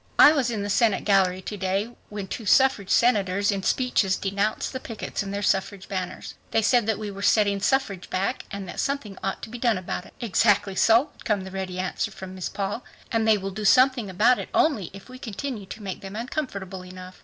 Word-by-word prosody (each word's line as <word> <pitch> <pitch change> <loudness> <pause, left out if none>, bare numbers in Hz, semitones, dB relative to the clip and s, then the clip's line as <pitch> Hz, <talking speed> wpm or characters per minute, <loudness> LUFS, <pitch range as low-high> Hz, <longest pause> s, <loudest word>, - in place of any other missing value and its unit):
I 295 - +9
was 275 -6 +1
in 215 -4 -2
the 205 - -3
Senate 220 -1 +2
gallery 190 -2 +3
to 210 - -5
day 195 +4 -1 0.2
when 205 -2 -5
two 220 +2 -6
suffrage. 265 -7 +4
senators 205 -4 +3
in 200 -1 -2
speeches 205 -4 +1
denounced 200 +5 -1
the 260 - -3
pickets 225 -3 -5
and 195 -1 -5
their 200 +1 -3
suffrage 195 0 0
banners. 185 -2 -5 0.2
They 225 - +1
said 235 0 +3
that 220 -3 +1
we 210 -1 -5
were 195 0 -8
setting 200 -1 +3
suffrage 210 -7 0
back 195 +7 -1
and 200 -2 -6
that - - -7
something 275 -8 -2
ought 195 - -3
to - - -6
be 245 - -7
done 230 -4 +2
about 180 0 -5
it." - - -19
"Exactly 205 -3 +2
so," 230 +9 +4
would - - -17
come 205 -4 0
the 190 - -8
ready 190 -1 -4
answer 185 +4 -2
from 190 -2 -9
Miss 185 -1 -4
Paul. 200 +4 -3 0.3
"And 225 -2 +1
they 220 -1 +5
will 195 0 -4
do 210 +3 -5
something 255 0 +4
about 225 +7 +3
it - - -6
only 225 - +2
if 195 0 -12
we 255 0 -11
continue 230 -2 -5
to 215 +2 -9
make 190 -2 -5
them 195 +1 -8
uncomfortable 215 -7 -4
enough. 185 0 -11
205 Hz, 225 wpm, -25 LUFS, 190-230 Hz, 0.3 s, I